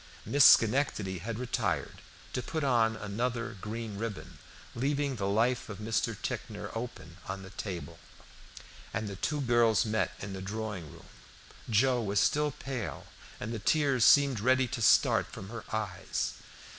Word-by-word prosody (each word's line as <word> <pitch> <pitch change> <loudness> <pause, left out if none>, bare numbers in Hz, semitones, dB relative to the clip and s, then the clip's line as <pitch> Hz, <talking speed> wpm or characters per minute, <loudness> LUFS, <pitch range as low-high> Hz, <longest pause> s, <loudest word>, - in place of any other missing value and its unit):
Miss 145 0 +4
Schenectady 110 -6 -1
had 110 +5 -4
retired 120 -7 -2 0.3
to 125 - -1
put 155 +5 -3
on 115 -4 +3
another 115 +3 -3
green 110 -1 -5
ribbon, 115 -2 -6 0.3
leaving 140 +2 0
the 100 -2 -1
life 115 +5 +1
of 105 - -6
Mr. 110 0 -1
Ticknor - - -5
open 115 -8 -6
on 95 0 -5
the 95 - -11
table, 85 -4 -6 1.0
and 110 - -2
the 100 - -5
two 150 +9 -1
girls 120 -4 +3
met 110 0 0
in 100 0 -6
the 95 - -6
drawing 100 -5 -5
room. - - -14 0.6
Joe 120 +3 +3
was 100 -2 +1
still 150 +8 +2
pale, 130 -4 -5 0.3
and 110 +3 -4
the 115 - -3
tears 135 +1 +2
seemed 140 -4 +6
ready 130 +3 +3
to 120 - -4
start - - +4
from 95 - -8
her 115 -1 -7
eyes. 100 -4 -2
115 Hz, 155 wpm, -30 LUFS, 100-125 Hz, 1.0 s, seemed